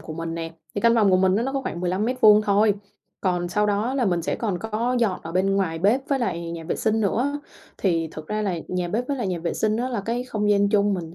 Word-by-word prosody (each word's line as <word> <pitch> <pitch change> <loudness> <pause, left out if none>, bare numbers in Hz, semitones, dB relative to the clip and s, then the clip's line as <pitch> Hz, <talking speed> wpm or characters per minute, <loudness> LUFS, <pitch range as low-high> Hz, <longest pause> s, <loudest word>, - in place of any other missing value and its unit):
của 160 - -8
mình 165 +1 -4
nè, 165 -1 -5 0.2
thì 205 - -2
căn 235 +1 +4
phòng 215 -4 +4
của 185 - +5
mình 185 +1 +3
á 225 - +1
nó 270 - -2
có 275 - -1
khoảng 175 - -4
15m² 210 +4 +4
thôi, 205 0 +3 0.5
còn 180 -2 0
sau 210 +3 +1
đó 210 +5 0
là 265 -3 +1
mình 175 -5 +1
sẽ - - -1
còn 205 -6 -2
có 225 +4 -1
dọn 215 -6 0
ở 165 - -7
bên 195 +2 +1
ngoài 165 -4 -1
bếp 210 +9 +3
với 275 - +1
lại 170 -8 -2
nhà 165 -1 -7
vệ 160 - -2
sinh 220 0 +1
nữa. 260 +8 0 0.4
Thì 165 -4 0
thực 155 0 -8
ra 215 +3 -2
là 185 -4 -1
nhà 180 -1 -2
bếp 235 +7 -2
với 285 - -1
lại 240 -5 -2
nhà 180 -2 -2
vệ 170 +1 -3
sinh 215 0 +1
á 245 +2 -1
là 240 -5 -2
cái 235 +5 -2
không 210 -4 -1
gian 200 0 +3
chung, 205 -1 +2
mình 165 -3 -6
205 Hz, 275 wpm, -24 LUFS, 180-225 Hz, 0.5 s, của